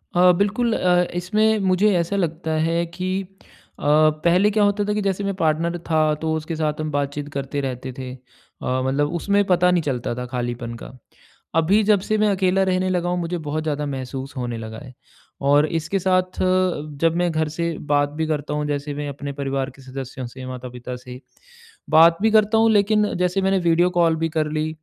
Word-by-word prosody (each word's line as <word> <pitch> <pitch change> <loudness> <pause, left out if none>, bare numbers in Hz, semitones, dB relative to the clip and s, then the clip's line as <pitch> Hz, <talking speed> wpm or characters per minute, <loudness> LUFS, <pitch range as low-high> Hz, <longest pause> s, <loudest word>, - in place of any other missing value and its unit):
अ, 180 +1 +6
बिल्कुल 220 +4 +1
अ, 180 -3 +3
इसमें 215 +5 +2
मुझे 200 +3 +3
ऐसा 170 +3 -1
लगता 165 -3 -2 0.2
है 170 +1 0
कि 180 +2 -4 0.7
अ, - - -10 0.4
पहले 180 +4 +4
क्या 210 0 +2
होता 205 0 +2
था 210 - 0
कि 210 - -1
जैसे 195 0 -1
मैं 200 0 -1
पार्टनर 165 0 0
था 160 -1 +3 0.2
तो 160 0 0
उसके 160 +1 -4
साथ 155 -1 -1
हम 155 - -3
बात-चीत 145 0 -2
करते 140 +1 -3
रहते 130 -1 -4
थे। 130 -1 -6
अ, - - -11 0.7
मतलब 145 +3 0
उसमें 200 +4 +2
पता 180 0 +4
नहीं 180 -1 +2
चलता 125 -5 -2
था 125 +1 -4
खालीपन 120 -1 -3
का। - - -9 0.7
अभी 195 +7 +3
जब 205 -2 +5
से 215 +3 -1
मैं 215 0 +3
अकेला 190 -1 +2
रहने 185 0 +1
लगा 175 -1 0
हूँ 180 0 0
मुझे 175 +1 -3
बहुत 155 0 -3
ज़्यादा 150 -1 -2
महसूस 135 0 -6
होने 120 -2 -3
लगा 110 0 -7
है। 130 - -11 0.6
और 145 +1 +5
इसके 165 +4 -2
साथ 185 0 0 0.6
जब 165 -1 +3
मैं 175 0 +1
घर 155 -1 0
से 170 0 0 0.2
बात 145 0 +3
भी 160 - +1
करता 150 -1 -2
हूँ 150 0 -1
जैसे 145 0 -3
मैं 145 0 -4
अपने 140 0 -6
परिवार 135 -1 -2
के 135 - -15
सदस्यों 130 -1 -7
से, 130 +2 -9
माता-पिता 125 -1 -7
से, 125 0 -10 0.7
बात 165 +2 +6
भी 220 - +4
करता 215 0 +4
हूँ 225 0 +4
लेकिन 210 0 +2
जैसे 180 +2 +1
मैंने 190 0 +2
वीडियो 175 +2 +3
कॉल 165 -1 +3
भी 165 +1 -1
कर 155 -1 +1
ली, 155 0 -1
160 Hz, 200 wpm, -22 LUFS, 140-185 Hz, 0.7 s, अ